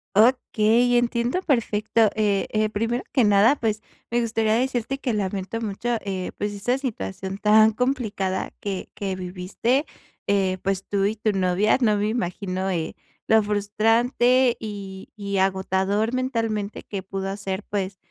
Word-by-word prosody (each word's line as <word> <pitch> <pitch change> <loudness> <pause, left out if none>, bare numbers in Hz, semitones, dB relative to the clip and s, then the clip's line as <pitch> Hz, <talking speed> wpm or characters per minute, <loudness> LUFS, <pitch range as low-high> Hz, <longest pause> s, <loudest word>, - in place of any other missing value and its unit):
Okey, 240 +1 +4
entiendo 240 +7 0
perfecto. 220 - +2
Eh 205 -2 +1
eh, 215 0 +1
primero 230 +4 -1
que 255 -4 +4
nada, 205 +6 +5
pues, 215 -4 -1 0.3
me 240 +1 +1
gustaría 225 -1 +1
decirte 255 +1 -1
que 250 -4 -2
lamento 200 +2 -2
mucho, 215 +2 -4 0.2
eh, 190 -2 -4
pues, 205 0 -2
esa 245 +6 0
situación 195 - -4
tan 215 +1 +5
complicada 215 -6 -1
que 195 -2 -4
que 195 -2 -3
viviste, 185 - -1 0.4
eh, 190 -2 +1
pues, 195 0 -1
tú 200 -1 0
y 210 +2 0
tu 215 0 0
novia. 190 +2 +2
No 215 -4 +3
me 205 +1 0
imagino, 190 -3 -2
eh, 165 -3 -2 0.4
lo 220 0 +6
frustrante 230 +5 +2
y 200 -3 -7
y 200 -1 -3
agotador 190 +3 +1
mentalmente 225 -5 -2
que 195 -3 -6
pudo 195 +1 -4
ser, 195 0 -4
pues, 195 -1 -2
210 Hz, 145 wpm, -24 LUFS, 195-235 Hz, 0.4 s, lo